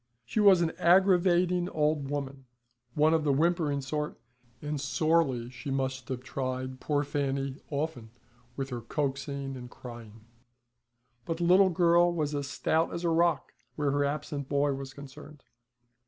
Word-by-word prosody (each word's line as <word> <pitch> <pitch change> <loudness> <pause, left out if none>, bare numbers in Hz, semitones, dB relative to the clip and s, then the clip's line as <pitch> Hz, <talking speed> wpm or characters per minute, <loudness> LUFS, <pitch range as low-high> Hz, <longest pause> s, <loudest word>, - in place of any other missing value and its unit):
She 170 - -2
was 195 -4 +6
an 165 -1 +1
aggravating 180 -1 +4
old 150 -3 0
woman, 140 -2 -4 0.5
one 155 +2 +4
of 160 -1 +2
the 145 - +2
whimpering 155 -1 +1
sort; 150 0 -4 0.4
and 150 0 -4
sorely 135 -3 +1
she 130 +3 -8
must 130 -1 -2
have 130 -1 -4
tried 130 0 -4
poor 145 0 0
Fanny 140 -1 -2
often 140 -6 -3 0.5
with 135 -1 -4
her 120 -1 -4
coaxing 140 +1 -3
and 125 -1 -9
crying, 115 -3 -11 1.0
but 165 +5 -3
the 175 - -2
little 185 +3 +6
girl 175 0 +4
was 155 -3 -2
as 140 -1 -3
stout 160 +3 0
as 170 - -5
a 170 - +2
rock 170 0 +1 0.2
where 145 -2 0
her 145 +1 +1
absent 140 -1 -3
boy 140 0 +2
was 135 0 -6
concerned. 140 +1 -12
145 Hz, 155 wpm, -29 LUFS, 135-165 Hz, 1.0 s, was